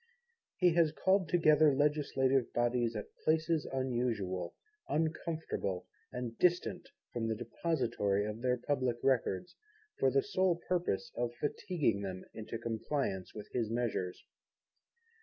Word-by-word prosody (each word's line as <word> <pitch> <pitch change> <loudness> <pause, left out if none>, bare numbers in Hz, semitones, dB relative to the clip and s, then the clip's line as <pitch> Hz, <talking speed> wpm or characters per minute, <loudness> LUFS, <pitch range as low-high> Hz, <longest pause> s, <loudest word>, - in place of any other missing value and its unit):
He 180 -3 +4
has 165 -2 +4
called 190 +1 +2
together 155 -4 +5
legislative 135 -3 +2
bodies 120 -1 +1
at 105 - -6
places 160 0 +2
unusual, 120 -9 -1 0.3
uncomfortable, 155 - -1 0.3
and 125 -2 -4
distant 180 +9 +1 0.2
from 115 -2 -1
the 110 - 0
depository 115 -5 0
of 105 +2 -5
their 125 0 +2
Public 130 -2 0
Records, 130 - +1 0.4
for - - +4
the 415 - +2
sole 190 - +2
purpose 175 - 0
of 120 0 -2
fatiguing 145 - 0
them 95 -2 -5
into 110 +1 -5
compliance 115 -3 -2
with 105 - -8
his 115 -3 0
measures. 115 -6 -2
125 Hz, 120 wpm, -33 LUFS, 110-155 Hz, 0.4 s, together